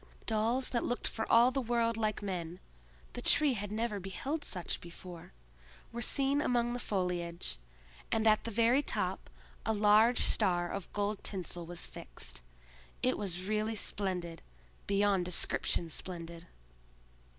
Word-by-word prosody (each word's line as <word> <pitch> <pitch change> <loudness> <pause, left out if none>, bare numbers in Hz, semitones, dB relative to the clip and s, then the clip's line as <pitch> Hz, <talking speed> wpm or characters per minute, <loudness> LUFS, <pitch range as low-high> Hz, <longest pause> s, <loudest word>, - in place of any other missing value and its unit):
Dolls 230 +4 +2
that 235 - +1
looked 245 - -1
for 220 - -3
all 235 +2 +7
the 270 +1 0
world 230 -1 +1
like 215 -2 -1
men—the 65 - -7
Tree 295 -3 +4
had 205 -3 -4
never 215 -1 -1
beheld 265 - -3
such 180 -9 -2
before—were 65 - -11
seen 275 +4 +2
among 240 -3 +1
the 245 - -3
foliage, 175 - -2 0.5
and 220 0 +2
at 215 -1 +5
the - - -3
very 230 +5 +4
top - - -2 0.3
a 220 - +1
large 215 +3 +5
star 175 -4 +2
of 200 -3 -5
gold 205 0 -1
tinsel 175 -3 -2
was 175 0 -5
fixed. - - -8 0.6
It 255 - +3
was 185 -3 -2
really 215 +2 0
splendid—beyond 180 - -1
description 175 -1 +1
splendid. 170 0 -4
200 Hz, 130 wpm, -33 LUFS, 170-230 Hz, 0.6 s, all